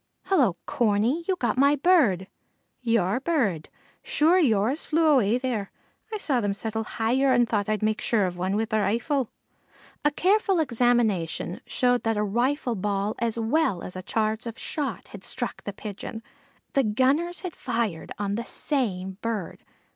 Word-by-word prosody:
"Hello, 200 Hz, -, +2 dB
Corney! 235 Hz, +8 st, +1 dB
you 380 Hz, -, +2 dB
got 255 Hz, -5 st, -1 dB
my 280 Hz, +2 st, +5 dB
bird!" 275 Hz, -, +3 dB, 0.6 s
"Your 230 Hz, -3 st, +1 dB
burrud! 245 Hz, -, 0 dB, 0.3 s
Sure 330 Hz, +5 st, +3 dB
yours 240 Hz, -, +2 dB
flew 325 Hz, +1 st, +1 dB
away 245 Hz, -7 st, +4 dB
thayre. 245 Hz, -6 st, -2 dB, 0.4 s
I 430 Hz, -, -2 dB
saw 275 Hz, -, 0 dB
them 205 Hz, -2 st, -1 dB
settle 220 Hz, +1 st, -3 dB
hayer 250 Hz, +5 st, +1 dB
and 240 Hz, -2 st, +4 dB
thought 205 Hz, -2 st, -1 dB
I'd 215 Hz, -1 st, 0 dB
make 215 Hz, 0 st, +1 dB
sure 215 Hz, -4 st, +2 dB
of 180 Hz, -1 st, -3 dB
wan 185 Hz, +2 st, -1 dB
with 220 Hz, +1 st, -1 dB
the 215 Hz, -, +2 dB
rifle." 235 Hz, +5 st, 0 dB, 0.7 s
A 295 Hz, -, +5 dB
careful 385 Hz, +4 st, +2 dB
examination 235 Hz, -, +1 dB
showed 245 Hz, -1 st, +2 dB
that 225 Hz, -1 st, 0 dB
a 210 Hz, -, +1 dB
rifle 245 Hz, +5 st, 0 dB
ball 205 Hz, 0 st, -1 dB
as 235 Hz, -1 st, -1 dB
well 230 Hz, -, +1 dB
as 180 Hz, -, -7 dB
a 185 Hz, -, -5 dB
charge 220 Hz, +3 st, -1 dB
of 230 Hz, -, -6 dB
shot 280 Hz, -6 st, -4 dB
had 200 Hz, -2 st, -10 dB
struck 245 Hz, -2 st, -4 dB
the 205 Hz, -, -3 dB
Pigeon. 210 Hz, +2 st, -7 dB, 0.5 s
The 275 Hz, -, +4 dB
gunners 270 Hz, +10 st, +1 dB
had 365 Hz, -3 st, -6 dB
fired 230 Hz, -, -2 dB
on 200 Hz, -1 st, -2 dB
the 230 Hz, +3 st, -2 dB
same 190 Hz, -11 st, -2 dB
bird. 220 Hz, -7 st, -4 dB
230 Hz, 165 wpm, -26 LUFS, 205-275 Hz, 0.7 s, my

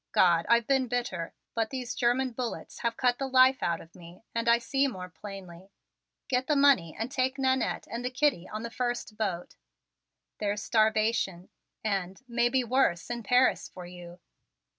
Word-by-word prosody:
God, 170 Hz, -1 st, +4 dB
I've 235 Hz, 0 st, +4 dB
been 265 Hz, 0 st, +2 dB
bitter! 235 Hz, -9 st, -2 dB, 0.2 s
But 225 Hz, -1 st, 0 dB
these 255 Hz, -3 st, -4 dB
German 250 Hz, +2 st, +1 dB
bullets 240 Hz, 0 st, -5 dB
have 230 Hz, -1 st, -2 dB
cut 245 Hz, -1 st, +2 dB
the 270 Hz, -, -1 dB
life 260 Hz, 0 st, +5 dB
out 170 Hz, -1 st, 0 dB
of 165 Hz, -, -15 dB
me 175 Hz, +3 st, -14 dB
and 230 Hz, 0 st, 0 dB
I 235 Hz, -, +6 dB
see 270 Hz, +4 st, +1 dB
more 185 Hz, -8 st, -6 dB
plainly. 185 Hz, 0 st, -10 dB, 0.6 s
Get 255 Hz, 0 st, 0 dB
the 300 Hz, -, +2 dB
money 275 Hz, -, +4 dB
and 230 Hz, +3 st, -3 dB
take 260 Hz, 0 st, 0 dB
Nannette 260 Hz, -2 st, 0 dB
and 235 Hz, +1 st, -5 dB
the 250 Hz, -, -1 dB
kiddie 255 Hz, -, 0 dB
on 215 Hz, +1 st, -5 dB
the 235 Hz, -, -5 dB
first 240 Hz, -3 st, -3 dB
boat. 190 Hz, -5 st, -3 dB, 0.8 s
There's 205 Hz, 0 st, -1 dB
starvation 215 Hz, -5 st, +1 dB, 0.3 s
and 195 Hz, -3 st, -2 dB
maybe 240 Hz, +2 st, +2 dB
worse 240 Hz, -7 st, +1 dB
in 240 Hz, -1 st, -3 dB
Paris 250 Hz, +4 st, +2 dB
for 180 Hz, -1 st, -10 dB
you. 175 Hz, 0 st, -11 dB
235 Hz, 170 wpm, -29 LUFS, 190-255 Hz, 0.8 s, I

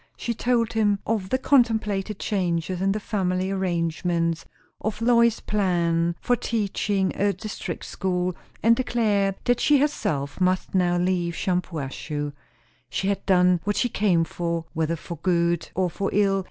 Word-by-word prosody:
She 235 Hz, -, -2 dB
told 235 Hz, 0 st, +1 dB
him 210 Hz, -2 st, +2 dB
of 210 Hz, -4 st, -1 dB
the 260 Hz, -, +2 dB
contemplated 220 Hz, -7 st, +2 dB
changes 180 Hz, -3 st, -1 dB
in 195 Hz, 0 st, +2 dB
the 210 Hz, -, -1 dB
family 190 Hz, -2 st, -1 dB
arrangements; 170 Hz, -2 st, -1 dB, 0.3 s
of 215 Hz, 0 st, -3 dB
Lois's 235 Hz, -1 st, +3 dB
plan 170 Hz, -4 st, +1 dB
for 245 Hz, -, +2 dB
teaching 205 Hz, -4 st, -1 dB
a 205 Hz, 0 st, +2 dB
district 215 Hz, 0 st, -6 dB
school; 180 Hz, -2 st, -1 dB, 0.3 s
and 230 Hz, +1 st, +6 dB
declared 210 Hz, -6 st, +1 dB
that 245 Hz, -1 st, +2 dB
she 295 Hz, -, +4 dB
herself 155 Hz, -, -1 dB
must 185 Hz, 0 st, +1 dB
now 175 Hz, -2 st, +2 dB
leave 175 Hz, -1 st, 0 dB
Shampuashuh. 150 Hz, -5 st, -3 dB, 0.6 s
She 190 Hz, -, -1 dB
had 200 Hz, -, -1 dB
done 180 Hz, -1 st, +4 dB
what 205 Hz, 0 st, -1 dB
she 245 Hz, -, +1 dB
came 190 Hz, -6 st, +2 dB
for, 170 Hz, 0 st, -3 dB
whether 160 Hz, 0 st, 0 dB
for 170 Hz, +1 st, -8 dB
good 170 Hz, -2 st, +1 dB
or 185 Hz, +1 st, +2 dB
for 195 Hz, +3 st, -2 dB
ill. 195 Hz, -1 st, +3 dB
190 Hz, 150 wpm, -25 LUFS, 170-215 Hz, 0.6 s, and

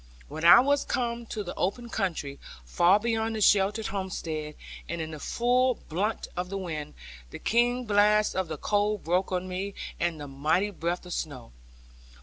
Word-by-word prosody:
When 160 Hz, -, -6 dB
I 175 Hz, +2 st, +10 dB
was 285 Hz, +2 st, +2 dB
come 235 Hz, -1 st, -2 dB
to 210 Hz, -, -4 dB
the 175 Hz, -, -6 dB
open 235 Hz, +6 st, -2 dB
country, 170 Hz, -11 st, -3 dB, 0.3 s
far 175 Hz, -, +4 dB
beyond 225 Hz, 0 st, -1 dB
the -, -, -2 dB
sheltered 205 Hz, +2 st, +3 dB
homestead, 165 Hz, -6 st, -4 dB, 0.3 s
and 170 Hz, -, -3 dB
in 160 Hz, 0 st, -4 dB
the 155 Hz, -, -7 dB
full 250 Hz, -, +2 dB
brunt 200 Hz, +6 st, -3 dB
of 180 Hz, 0 st, -3 dB
the 195 Hz, -, -3 dB
wind, 155 Hz, -5 st, -5 dB, 0.3 s
the -, -, -8 dB
keen 245 Hz, +2 st, +1 dB
blast 210 Hz, 0 st, +3 dB
of 190 Hz, -2 st, 0 dB
the 155 Hz, -1 st, -5 dB
cold 205 Hz, +3 st, 0 dB
broke 180 Hz, +4 st, 0 dB
on 185 Hz, 0 st, -1 dB
me, 190 Hz, +2 st, -4 dB, 0.2 s
and 170 Hz, -2 st, -1 dB
the 145 Hz, -, -6 dB
mighty 155 Hz, +9 st, 0 dB
breadth 175 Hz, -1 st, -3 dB
of 180 Hz, -, -6 dB
snow. 130 Hz, -, -5 dB
190 Hz, 175 wpm, -28 LUFS, 165-215 Hz, 0.3 s, I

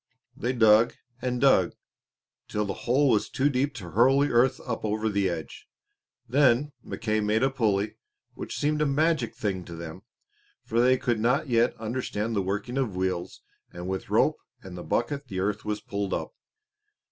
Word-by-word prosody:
They 120 Hz, -, -1 dB
dug 115 Hz, -2 st, +5 dB, 0.3 s
and 125 Hz, -1 st, -1 dB
dug 120 Hz, -10 st, +4 dB, 0.7 s
till 105 Hz, 0 st, -1 dB
the 100 Hz, -, -3 dB, 0.2 s
hole 140 Hz, +3 st, +4 dB
was 110 Hz, -, +1 dB
too 140 Hz, +2 st, +1 dB
deep 135 Hz, +1 st, 0 dB
to 90 Hz, -8 st, -8 dB
hurl 125 Hz, +7 st, +4 dB
the 145 Hz, -, +1 dB
earth 125 Hz, +2 st, +3 dB
up 115 Hz, -3 st, -3 dB
over 110 Hz, +1 st, 0 dB
the 100 Hz, -2 st, +1 dB
edge. 80 Hz, -4 st, -6 dB, 0.6 s
Then 135 Hz, +2 st, +3 dB
Mackay 110 Hz, -1 st, -2 dB
made 105 Hz, +3 st, +1 dB
a 135 Hz, -, +3 dB
pulley, 105 Hz, -6 st, 0 dB, 0.4 s
which -, -, -6 dB
seemed 150 Hz, +1 st, 0 dB
a 150 Hz, -, +3 dB
magic 145 Hz, -4 st, +1 dB
thing 95 Hz, -4 st, -2 dB
to 85 Hz, -, -8 dB
them, 85 Hz, +2 st, -8 dB, 0.6 s
for 115 Hz, +1 st, +1 dB
they 130 Hz, +1 st, +4 dB
could 120 Hz, -3 st, 0 dB
not 125 Hz, +5 st, +1 dB
yet 120 Hz, 0 st, +2 dB
understand 115 Hz, -1 st, -3 dB
the 100 Hz, -, +2 dB
working 105 Hz, +7 st, -2 dB
of 115 Hz, -8 st, -1 dB
wheels; 95 Hz, -1 st, -2 dB, 0.3 s
and 90 Hz, +1 st, -7 dB
with 95 Hz, 0 st, -4 dB
rope -, -, +3 dB, 0.3 s
and 95 Hz, -2 st, -9 dB
bucket 140 Hz, -, -1 dB
the 95 Hz, -5 st, -4 dB
earth 100 Hz, +2 st, -1 dB
was 105 Hz, 0 st, -2 dB
pulled 100 Hz, -1 st, -2 dB
up. -, -, -5 dB
115 Hz, 175 wpm, -27 LUFS, 100-130 Hz, 0.7 s, dug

